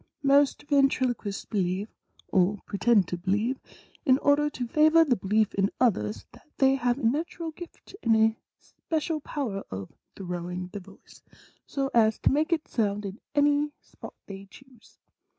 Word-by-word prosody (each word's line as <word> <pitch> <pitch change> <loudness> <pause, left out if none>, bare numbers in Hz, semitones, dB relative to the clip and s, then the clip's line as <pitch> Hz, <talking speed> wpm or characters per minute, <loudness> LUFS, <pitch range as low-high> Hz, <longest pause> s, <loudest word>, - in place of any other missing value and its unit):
"Most 280 0 +3
ventriloquists 260 -7 +1
believe, 190 0 -1 0.4
or 190 +2 +2
pretend 200 -1 +2
to 175 - -3
believe, 210 +8 0 0.4
in 260 -4 +4
order 290 +1 +2
to 250 -4 -5
favor 310 +5 +5
the 260 -5 +2
belief 210 +2 +1
in 195 0 +1
others, 105 - 0
that - - -19
they 270 0 +4
have 245 -2 0
a 280 - -8
natural 320 +7 -1
gift 345 +3 -12
and 230 -1 +3
a 220 0 +3 0.2
special 320 0 -4
power 240 -11 -4
of 95 0 -7 0.2
throwing 180 -1 -5
the 205 - -7
voice, 195 +1 -17 0.5
so 275 -1 -2
as 220 -2 +4
to - - +3
make 305 +5 +1
it 320 -2 0
sound 210 -3 -1
in 200 +3 -7 0.2
any 290 0 +2
spot - - -13
they 195 0 -9
choose. 260 0 -19
235 Hz, 155 wpm, -27 LUFS, 195-285 Hz, 0.5 s, favor